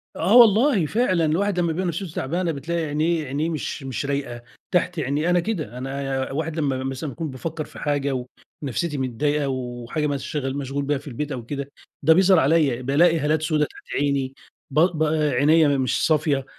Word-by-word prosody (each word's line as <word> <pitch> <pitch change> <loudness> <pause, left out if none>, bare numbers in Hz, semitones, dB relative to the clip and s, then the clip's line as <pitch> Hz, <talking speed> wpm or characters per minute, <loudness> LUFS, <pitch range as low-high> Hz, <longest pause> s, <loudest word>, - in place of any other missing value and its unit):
آه 210 +6 +2
والله 225 - +6
فعلًا 185 -4 +1
الواحد 180 +4 +1
لمّا 170 -2 +1
بيبقي 185 +2 -2
نفسيته 170 +1 -3
تعبانة 170 +5 -1
بتلاقي 160 +3 -3
عينيه 155 +2 0
عينيه 145 +5 -2
مش 155 -2 -4
مش 135 +1 -4
رايقة، 140 -4 -3 0.3
تحت 180 -1 +1
عيني 150 +4 0
أنا 175 0 +4
كده 170 - -3
أنا 135 0 -3
واحد 160 +3 -3
لمّا 135 -3 -1
مثلًا 135 +3 -4
باكون 160 +3 -5
بافكر 155 +4 -5
في - - -13
حاجة 140 -3 -1 0.4
ونفسيتي 145 +3 -2
متضايقة 140 +3 0
وحاجة 125 +3 -3
مشغل 140 -1 -3
مشغول 140 0 -3
بيها 145 0 +1
في 145 +2 -12
البيت 145 +3 -4
أو 120 -3 -5
كده 140 +1 -5 0.3
ده 160 +3 +7
بيظهر 185 +1 +5
عليَّ، 140 -5 +2
بالاقي 160 +6 +3
هالات 155 +1 +1
سودة 155 -1 +1
تحت - - -14
عيني، 140 -2 0 0.4
ب 150 - +2
ب 165 -2 +3 0.3
عينيَّ 155 +4 +4
مش 130 -2 0
صافية، 150 -4 +1
150 Hz, 175 wpm, -23 LUFS, 135-165 Hz, 0.4 s, ده